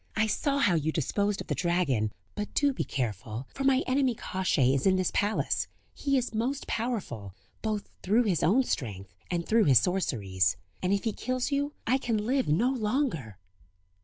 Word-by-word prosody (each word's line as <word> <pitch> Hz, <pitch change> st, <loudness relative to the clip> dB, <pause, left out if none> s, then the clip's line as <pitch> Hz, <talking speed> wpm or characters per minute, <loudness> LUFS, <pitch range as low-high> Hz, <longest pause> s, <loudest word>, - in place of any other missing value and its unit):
I 220 Hz, -, +3 dB
saw 275 Hz, +6 st, 0 dB
how 205 Hz, -10 st, +3 dB
you 160 Hz, -1 st, +1 dB
disposed 200 Hz, +7 st, 0 dB
of -, -, -6 dB
the -, -, 0 dB
dragon; 160 Hz, -, +1 dB, 0.2 s
but 210 Hz, 0 st, -4 dB
do 285 Hz, -1 st, +3 dB
be -, -, -2 dB
careful, 110 Hz, -1 st, -3 dB
for 270 Hz, -, -4 dB
my 270 Hz, 0 st, +4 dB
enemy, 260 Hz, -2 st, +2 dB
Kosciey, 170 Hz, -11 st, +1 dB
is 135 Hz, +6 st, +1 dB
in 190 Hz, -, +5 dB
this 185 Hz, -1 st, +1 dB
palace; 205 Hz, +2 st, 0 dB, 0.3 s
he 275 Hz, -1 st, 0 dB
is 245 Hz, -2 st, -1 dB
most 250 Hz, +6 st, -1 dB
powerful, 190 Hz, -, -3 dB, 0.3 s
both 215 Hz, -2 st, -2 dB
through 215 Hz, +6 st, +3 dB
his 190 Hz, -7 st, +1 dB
own 235 Hz, +10 st, +4 dB
strength, 100 Hz, -, -4 dB, 0.2 s
and 170 Hz, -1 st, -1 dB
through 225 Hz, -1 st, +4 dB
his 135 Hz, -4 st, +6 dB
sorceries; 100 Hz, -, +1 dB, 0.2 s
and 185 Hz, -, 0 dB
if 200 Hz, 0 st, +1 dB
he 225 Hz, -, 0 dB
kills 255 Hz, +4 st, -2 dB
you 285 Hz, +1 st, 0 dB
I 260 Hz, +4 st, +2 dB
can 235 Hz, -4 st, 0 dB
live 260 Hz, +2 st, +1 dB
no 210 Hz, -, +3 dB
longer. 215 Hz, -, -1 dB
205 Hz, 185 wpm, -29 LUFS, -, 0.3 s, his